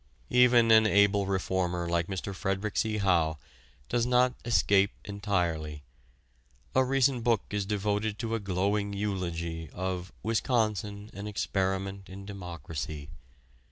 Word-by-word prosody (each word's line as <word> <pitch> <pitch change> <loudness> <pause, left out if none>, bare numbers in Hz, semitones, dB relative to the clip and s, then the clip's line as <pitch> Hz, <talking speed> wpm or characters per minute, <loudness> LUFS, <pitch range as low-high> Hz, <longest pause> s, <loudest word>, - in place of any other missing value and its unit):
Even 120 -2 +6
an 110 0 +7
able 100 -1 +4
reformer 90 -2 -1
like 85 0 0
Mr. 95 +1 -4
Frederic 95 +2 -2
C. 110 -1 +1
Howe 85 -6 +2 0.5
does 120 - +1
not 125 +1 +3
escape 100 -4 +3 0.2
entirely. 85 -7 -2 0.9
A 130 - +4
recent 130 -1 +2
book 115 -3 +2
is 100 -1 -1
devoted 105 +1 -1
to 115 0 -3
a 115 - 0
glowing 100 +1 0
eulogy 85 -5 -3
of 90 +1 -4
"Wisconsin, 110 -3 0
an 100 +2 -6
Experiment 95 -1 -2
in 95 +1 -9
Democracy." 80 -6 -6
100 Hz, 125 wpm, -29 LUFS, 90-110 Hz, 0.9 s, an